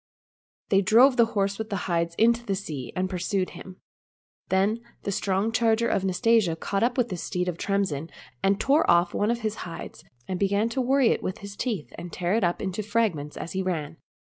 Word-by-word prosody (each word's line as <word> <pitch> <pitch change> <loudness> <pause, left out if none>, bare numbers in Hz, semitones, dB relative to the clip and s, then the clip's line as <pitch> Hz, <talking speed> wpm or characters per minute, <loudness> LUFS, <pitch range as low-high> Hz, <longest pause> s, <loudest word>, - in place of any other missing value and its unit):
They 195 0 +4
drove 240 +7 +6
the 235 -2 +5
horse 200 +1 0
with 220 0 -4
the 200 - -2
hides 170 -2 0
into 235 +3 +3
the 200 -4 -1
sea, 150 -9 -6
and 185 +1 0
pursued 185 +1 -1
him. 185 -1 -11 0.7
Then 200 +5 +2 0.2
the 200 - -2
strong 195 +3 0
charger 230 0 +2
of 195 - 0
Nastasia 195 -1 +2
caught 195 +4 -2
up 240 +1 +2
the 240 -7 0
steed 180 +1 -3
of 175 -2 -3
Tremsin 190 -7 -1 0.3
and 195 +1 +2
tore 285 +6 +3
off 175 +1 +4
one 205 - +1
of 235 0 0
his 215 -1 -2
hides, 170 -2 -8 0.2
and 185 -1 -3
began 200 +3 +1
to 260 +3 -1
worry 265 0 +3
it - - +1
with 185 - -3
his 200 0 -8
teeth 215 - -3
and 175 - -7
tear 180 +1 -1
it 225 -1 +2 0.3
to 215 - -2
fragments 205 -9 -1
as 165 - -6
he 190 - -1
ran. 165 -4 -3
200 Hz, 200 wpm, -26 LUFS, 180-225 Hz, 0.7 s, drove